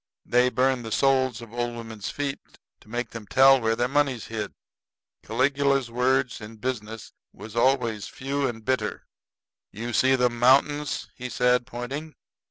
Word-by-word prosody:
They 125 +1 +3
burn 130 0 +1
the 110 -1 -7
soles 130 -2 +2
of 115 -1 -13
old 120 0 -2
women's 110 -3 -6
feet 140 -1 -3 0.4
to - - -21
make 120 +1 -3
them 115 -3 -8
tell 135 +2 +6
where 115 0 +1
their 120 +1 +1
money's 135 -4 0
hid." 110 -2 -4 0.7
Caligula's 135 +1 +1
words 125 +1 +1
in 105 +2 -9
business 110 -2 -5 0.2
was 110 0 -11
always 115 -4 +1
few 135 +1 -2
and 115 -3 -6
bitter. 130 0 -1 0.7
"You 120 +3 -5
see 130 +4 +4
them 125 -2 +1
mountains," 140 +4 +3 0.2
said 125 0 +2
he, - - -27
pointing. 135 +5 -6
125 Hz, 155 wpm, -25 LUFS, 115-135 Hz, 0.7 s, tell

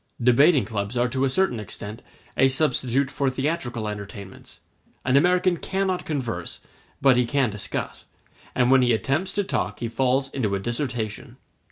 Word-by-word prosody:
Debating 135 +5 +5
clubs 105 +1 -3
are 120 +1 +3
to 130 +2 0
a - - +1
certain 130 -4 +1
extent 105 +2 -7 0.3
a 135 - +5
substitute 135 -1 +1
for 140 -1 0
theatrical 130 -5 -2
entertainments: 100 -1 -8 0.5
an 130 +1 +2
American 180 +4 +4
cannot 190 0 -1
converse, 130 -7 -3 0.4
but 135 -2 +6
he 125 - +3
can 130 -2 +1
discuss; 105 -1 -5 0.5
and 125 0 +3
when 135 -1 +6
he 120 -1 +3
attempts 140 +11 0
to 205 - 0
talk - - -2
he 120 - -2
falls 130 +3 +1
into 105 -7 -1
a - - -1
dissertation. 120 -1 -3
130 Hz, 160 wpm, -24 LUFS, 115-140 Hz, 0.5 s, but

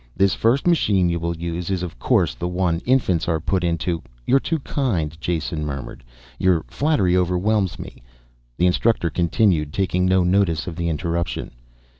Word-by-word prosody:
This 95 -1 +3
first 120 +8 +1
machine 100 - +3
you 85 0 -1
will 85 0 -3
use 85 +1 -4
is 95 -2 -1
of 85 -9 -7
course - - +2
the 90 - -4
one 90 -2 0
infants 105 -11 +2
are 80 -2 +1
put 90 +3 -1
into 85 0 -1
" - - -30
"You're 135 - +4
too 165 +4 -1
kind," 105 - -2
Jason 80 -2 -2
murmured. 70 -3 -6 0.4
"Your 90 -4 +2
flattery 140 - +1
overwhelms 90 +2 +1
me." - - -10 0.6
The 90 - +2
instructor 90 -1 +2
continued, 85 -4 +1
taking 90 -1 0
no 95 0 +3
notice 90 -4 +1
of 90 - -6
the 85 -1 -2
interruption. 85 +1 -2
90 Hz, 170 wpm, -22 LUFS, 85-95 Hz, 0.6 s, You're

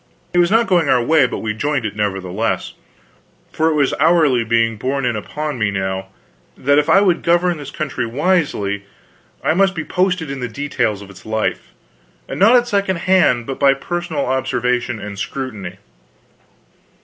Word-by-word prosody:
It 175 - +3
was 175 0 +4
not 225 +3 +3
going 175 -8 +2
our 125 -2 +3
way, 145 0 +4
but - - -5
we 110 -1 -1
joined 140 +2 -1
it, 110 - -4
nevertheless; 100 0 -2 0.8
for 160 - +1
it 160 - 0
was 140 -3 +2
hourly 150 -8 +4
being 115 0 +1
borne 135 +4 -2
in 120 -2 0
upon 150 +6 -4
me 105 -2 +1
now, 95 -1 -3 0.5
that 140 +2 +3
if 150 +2 -1
I 195 +5 +6
would 180 -4 +2
govern 175 0 +2
this 145 -2 -8
country 140 -5 -3
wisely, 125 - 0 0.6
I 155 - +2
must 190 +2 +2
be 160 -2 -4
posted 180 -5 0
in 140 - -5
the 125 - -3
details 110 -5 -2
of 100 - -13
its 95 - -15
life, 110 0 -3 0.5
and - - -6
not 220 +6 +6
at 245 -1 +3
second 200 -4 0
hand, 175 -11 +3
but 135 +1 -5
by 140 -1 +5
personal 170 0 -3
observation 125 -2 -1
and 105 -1 -7
scrutiny. 105 -6 -5
135 Hz, 175 wpm, -18 LUFS, 110-170 Hz, 0.8 s, I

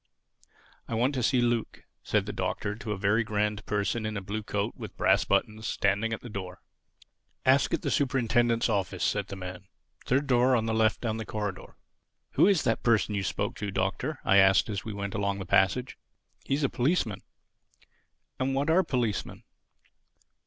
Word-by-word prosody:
"I 115 - -3
want 125 +5 +1
to 130 - -1
see 125 +1 +2
Luke," 120 -2 -1 0.2
said - - 0
the - - -5
Doctor 100 - -2
to 110 0 -6
a 105 - -2
very 100 +4 +2
grand 105 -1 -1
person 105 +2 -1
in 110 -1 -3
a - - -1
blue 105 +3 -4
coat 105 -1 -2
with - - -9
brass - - +3
buttons 110 0 0
standing 100 +3 0
at 110 - -3
the - - -9
door. 95 -3 -6 0.9
"Ask 130 +1 +4
at - - -7
the - - -1
Superintendent's 120 -3 +2
office," 100 -4 -1
said 100 -2 0
the 100 - -7
man. 90 0 -8 0.4
"Third 135 +3 +2
door 125 -1 +4
on 115 -2 +1
the 110 - -1
left 110 -1 +2
down 110 -2 -2
the 110 - -4
corridor." 105 -3 -5 0.6
"Who - - +4
is 195 -6 +3
that - - 0
person 110 -3 +2
you 100 - 0
spoke 95 - -2
to, 105 - -3
Doctor?" 100 +10 -2
I 100 - +5
asked 95 +2 +5
as 100 -3 -3
we 110 - -5
went 100 0 -4
along 100 -2 -1
the 95 - -5
passage. 95 +8 +1 0.5
"He 135 - +1
is 145 - -2
a - - +4
policeman." 125 - 0 1.2
"And 135 +1 0
what 140 +4 +1
are 180 +3 +5
policemen?" 125 - -2
110 Hz, 190 wpm, -28 LUFS, 100-125 Hz, 1.2 s, I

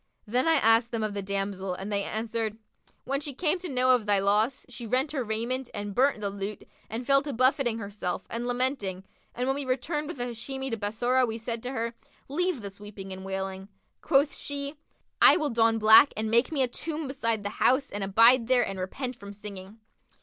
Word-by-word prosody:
Then 245 +6 0
I 325 - +5
asked 225 -3 +4
them 230 -2 -2
of 215 -1 -2
the 200 - -3
damsel, 195 -1 -2
and 195 +3 -6
they 200 - +1
answered, 220 +1 -3 0.5
'When 275 +1 -2
she 285 -3 -5
came 355 +4 +1
to 360 -1 -6
know 255 -1 +3
of 240 -4 +2
thy 205 -1 +4
loss, 210 +6 +1
she 240 -2 -8
rent 260 +5 +1
her 275 -4 -2
raiment 235 +4 -2
and 205 -1 -4
burnt 260 -1 +2
the 200 -1 -2
lute 200 +1 -6 0.2
and 230 +3 -4
fell 275 +1 +4
to 290 0 -5
buffeting 255 -1 +2
herself 200 -4 -4
and 235 +1 -4
lamenting 245 -7 -1 0.3
and 250 - -1
when 270 - +1
we 285 - -3
returned 290 +4 -2
with 335 - -6
the 245 - -2
Hashimi 265 +3 -4
to - - 0
Bassorah 240 +5 +1
we 225 0 -3
said 230 0 -4
to 250 - -5
her, 230 -1 -2 0.4
'Leave 350 -1 -1
this 200 0 -8
weeping 200 -2 -8
and 190 0 -8
wailing.' 190 0 -4 0.3
Quoth 280 +1 +3
she, 280 +1 -5 0.5
'I - - +8
will 300 -5 -1
don 225 -1 +3
black 220 +6 +7
and 220 0 -1
make 235 +7 +3
me 280 -4 +2
a - - +2
tomb 310 +4 -5
beside 230 -5 -1
the 205 - -2
house 265 +2 +3
and 205 0 -3
abide 230 +5 +5
there 250 -2 +4
and 195 -1 -5
repent 250 +7 -4
from 200 -3 -10
singing.' 200 0 -9
230 Hz, 215 wpm, -27 LUFS, 205-265 Hz, 0.5 s, I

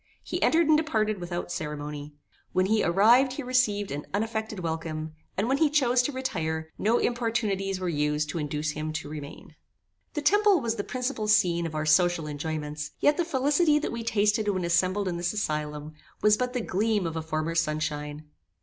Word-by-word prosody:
He - - -4
entered 330 0 +4
and 310 - +6
departed 215 - 0
without 175 0 -4
ceremony. 150 -1 -5 0.4
When 185 0 +3
he 215 +2 +2
arrived 230 +9 +5
he 285 - -5
received 235 -6 +1
an 145 +1 -5
unaffected 220 -1 -2
welcome, 160 -1 -4 0.2
and 200 +4 +1
when 270 +2 +1
he 315 - +4
chose 255 -4 +3
to 250 - -1
retire, 160 - -3
no 225 +4 +3
importunities 220 -5 -1
were 185 - -3
used 150 -1 0
to 165 - -3
induce 150 0 -2
him 155 +1 -4
to 155 - -4
remain. 150 -2 -9 0.6
The 300 - -2
temple 410 +2 +5
was 230 -4 -1
the 205 - -2
principal 250 -3 -3
scene 170 -5 +3
of 155 - -7
our 155 0 -1
social 170 +1 +3
enjoyments; 150 0 -4
yet 290 - +3
the 345 - +2
felicity 295 +1 +2
that 300 - -2
we 235 - -4
tasted 210 -1 +1
when 185 -3 0
assembled 185 +3 +1
in 175 -2 -2
this 175 +2 -1
asylum, 150 -5 -3 0.3
was 210 0 +6
but 250 +2 -2
the 250 - -1
gleam 210 -1 0
of 165 -1 -3
a 160 - -2
former 155 +1 -2
sun 155 -2 0
shine. 150 -1 -4
185 Hz, 190 wpm, -27 LUFS, 155-235 Hz, 0.6 s, and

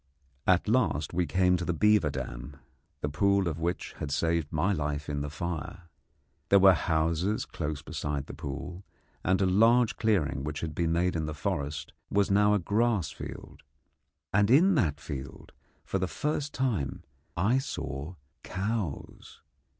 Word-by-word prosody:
At 95 +1 +4
last 95 - +1
we 90 0 +1
came 90 -1 +3
to 90 - -3
the 85 -1 -1
beaver 105 -2 +4
dam, 70 0 -6 0.4
the - - 0
pool 100 +6 +2
of 80 -1 -3
which 85 +2 -2
had - - -3
saved 80 +1 0
my 95 +7 +1
life 75 -2 -2
in 70 -1 -2
the 75 - -3
fire. 85 +2 -5 0.7
There 100 - +7
were 95 0 +8
houses 85 +5 0
close 75 -1 -4
beside 75 -2 -3
the - - -9
pool, 80 +5 -6 0.4
and 95 +2 +2
a - - +4
large 115 +5 +4
clearing 90 -11 +1
which 75 0 -4
had 80 -2 -3
been 80 +1 0
made 90 +2 +1
in 80 -2 -1
the 75 - -4
forest 75 -5 -3 0.2
was 100 -1 +2
now 105 +1 +4
a - - +2
grass 105 -2 +1
field, - - -9 0.7
and 100 +1 +4
in 170 +10 +6
that 80 - +1
field 65 -1 -7 0.3
for 95 - -1
the 95 - 0
first 150 +5 -2
time 115 - -1 0.3
I 110 +10 +3
saw 75 - -5 0.3
cows. 100 -5 -4
85 Hz, 160 wpm, -29 LUFS, 75-100 Hz, 0.7 s, were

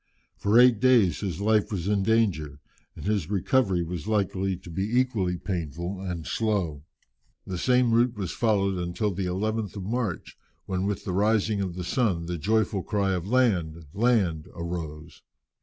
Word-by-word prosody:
For 105 +3 +2
eight 125 -3 +6
days 115 - +4
his 95 -4 -3
life 105 +1 +2
was 95 -3 -3
in 100 -1 +2
danger, 95 -10 +1 0.4
and - - -9
his 100 -5 0
recovery 100 -2 +1
was 85 0 -5
likely 95 -3 0
to 90 -2 -12
be 100 +8 0
equally 100 -9 0
painful 85 +1 -4
and 90 -4 -4
slow. 95 -10 -1 0.6
The 90 -2 -4
same 125 +1 +3
route 120 +1 +3
was 95 -4 -3
followed 100 -5 +1
until 90 +4 -1
the 95 0 -2
11th 105 +3 -2
of 100 - -5
March, 110 -3 -3 0.3
when 95 +1 -1
with 100 -1 -3
the 95 - -2
rising 105 +1 +2
of 90 -3 -3
the 90 - -4
sun 95 -5 0
the 85 0 -4
joyful 105 +1 +1
cry 100 -1 0
of 90 -1 -2
"Land! 90 -10 +1
land!" 100 -9 +1
arose. 80 -2 -6
95 Hz, 165 wpm, -26 LUFS, 85-110 Hz, 0.6 s, eight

